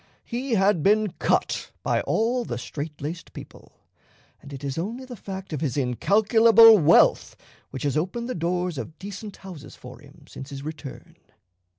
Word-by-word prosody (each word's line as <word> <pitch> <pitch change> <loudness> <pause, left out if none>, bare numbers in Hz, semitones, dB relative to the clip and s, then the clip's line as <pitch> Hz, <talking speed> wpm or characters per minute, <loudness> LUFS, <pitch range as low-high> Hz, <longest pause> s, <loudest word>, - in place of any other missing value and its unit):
He 250 +1 -3
had 195 -4 +2
been 210 +2 +2
cut - - 0
by - - 0
all 240 +3 0
the 120 - -5
strait 145 +4 -7
laced 165 +4 -6
people; - - -13 0.7
and 145 - -13
it 135 0 -9
is 135 -1 -3
only 230 +9 -5
the 250 -1 -9
fact 190 -3 -8
of 150 - -4
his 145 -4 -2
incalculable 220 - +5
wealth 165 +1 +4 0.3
which 130 - -7
has 145 -1 -1
opened 190 +10 -2
the 255 - -3
doors 175 -2 -2
of 155 - -8
decent 200 +1 -8
houses 175 -7 -11
for 125 +1 -12
him 145 +1 -18
since 135 - -10
his 140 -1 -8
return." 155 -3 -9
175 Hz, 170 wpm, -24 LUFS, 145-215 Hz, 0.7 s, incalculable